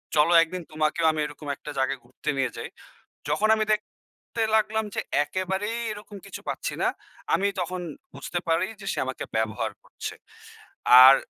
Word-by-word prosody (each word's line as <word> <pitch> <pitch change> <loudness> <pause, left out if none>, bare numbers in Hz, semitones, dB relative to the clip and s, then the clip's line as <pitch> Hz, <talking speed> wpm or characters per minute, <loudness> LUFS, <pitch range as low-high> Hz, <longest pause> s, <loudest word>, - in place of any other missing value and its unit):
চলো 150 +3 +5
একদিন 180 +2 -5
তোমাকেও 155 +2 +1
আমি 155 - -3
এরকম 150 0 -8
একটা 150 - -8
জায়গায় 135 0 +1
ঘুরতে 150 - -6
নিয়ে 130 -3 +1
যাই।" - - -4 0.6
যখন 155 +9 +3
আমি 215 - +1
দেখতে 210 - -5 0.5
লাগলাম 220 0 +3
যে, - - 0 0.2
একেবারেই 190 +7 -2
এরকম 210 0 -9
কিছু 195 - -7
পাচ্ছি - - -2
না। - - +4 0.5
আমি 200 - +3
তখন 180 +1 -2 0.3
বুঝতে 140 +6 -3
পারি 165 +3 +3
যে, 195 - -8
সে - - -3
আমাকে 130 - -4
ব্যবহার 110 -1 0
করছে। - - -6 0.9
আর 135 +1 +11
170 Hz, 160 wpm, -26 LUFS, 150-200 Hz, 0.9 s, আর